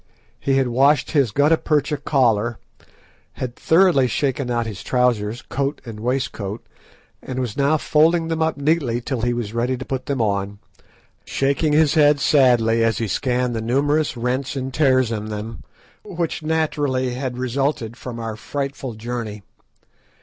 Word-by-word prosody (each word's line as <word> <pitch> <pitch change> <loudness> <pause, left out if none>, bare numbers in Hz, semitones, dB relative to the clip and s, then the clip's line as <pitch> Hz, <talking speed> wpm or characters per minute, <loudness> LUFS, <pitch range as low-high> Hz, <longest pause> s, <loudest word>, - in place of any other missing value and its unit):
He 135 - 0
had 135 -1 +2
washed 140 +5 +3
his 140 -6 +3
gutta 145 +8 +3
percha 150 -1 0
collar, 120 -6 +1 0.8
had 125 -2 -5
thoroughly 165 -6 +4
shaken 135 +1 -1
out 120 -1 0
his 105 -4 -6
trousers, 120 -3 0
coat 140 +1 -2
and 110 -3 -8
waistcoat, 115 -3 -3 0.6
and 130 - -6
was 125 -5 -2
now 140 +3 +2
folding 165 +3 +2
them 165 0 -2
up 160 -1 +1
neatly 140 -5 +1
till 125 0 -3
he 120 +1 +1
was 120 -3 -3
ready 120 +2 0
to 130 - -7
put 130 -1 -4
them 140 -2 -1
on, 100 -2 -1 0.7
shaking 140 +3 0
his 155 -1 +4
head 150 -2 +4
sadly 120 -6 +4
as 115 0 +1
he 115 - -1
scanned 125 +3 -1
the 110 - -2
numerous 140 +5 +1
rents 130 +4 -2
and 130 -1 -4
tears 130 -4 +3
in 105 -2 -3
them, 110 +1 -6 0.4
which 170 -2 -3
naturally 145 -5 0
had 125 -1 -4
resulted 130 -2 -1
from 125 -1 -7
our 115 -2 -4
frightful 135 0 -5
journey. 110 -2 -5
130 Hz, 155 wpm, -21 LUFS, 115-145 Hz, 0.8 s, thoroughly